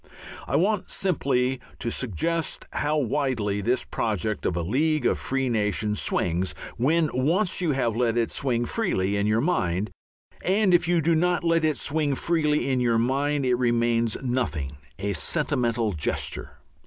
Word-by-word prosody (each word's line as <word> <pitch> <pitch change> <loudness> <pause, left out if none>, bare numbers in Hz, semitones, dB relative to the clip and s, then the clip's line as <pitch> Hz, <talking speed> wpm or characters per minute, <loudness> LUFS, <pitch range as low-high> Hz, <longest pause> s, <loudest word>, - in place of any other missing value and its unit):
I - - -1
want 195 +5 +1
simply 135 -8 0 0.2
to 115 - -3
suggest 150 - -2
how 150 +1 0
widely 120 -7 0
this 120 +5 +1
project 110 -1 -2
of 85 - -1
a 85 - -1
League 150 - +1
of - - +2
Free 135 0 -1
Nations 105 -2 0
swings 90 +2 0 0.2
when 155 +6 +2
once 170 +10 +1
you 165 -5 +1
have 120 -5 0
let 120 -1 +1
it 115 -1 +1
swing 120 -3 0
freely 100 - 0
in 100 +1 +1
your 110 +2 +2
mind! 105 - 0 0.5
And 195 0 +3
if 170 -2 +4
you 175 -1 +3
do 165 +2 +2
not 175 +2 +1
let 165 -1 +2
it 155 -2 +1
swing 145 -2 0
freely 150 -2 +1
in 130 - +1
your 120 -2 +2
mind, 140 +4 +1
it 125 - +2
remains 120 -2 +1
nothing 85 - -2 0.2
a 100 +1 -2
sentimental 115 - 0
gesture. 75 -3 -3
125 Hz, 160 wpm, -25 LUFS, 110-155 Hz, 0.5 s, if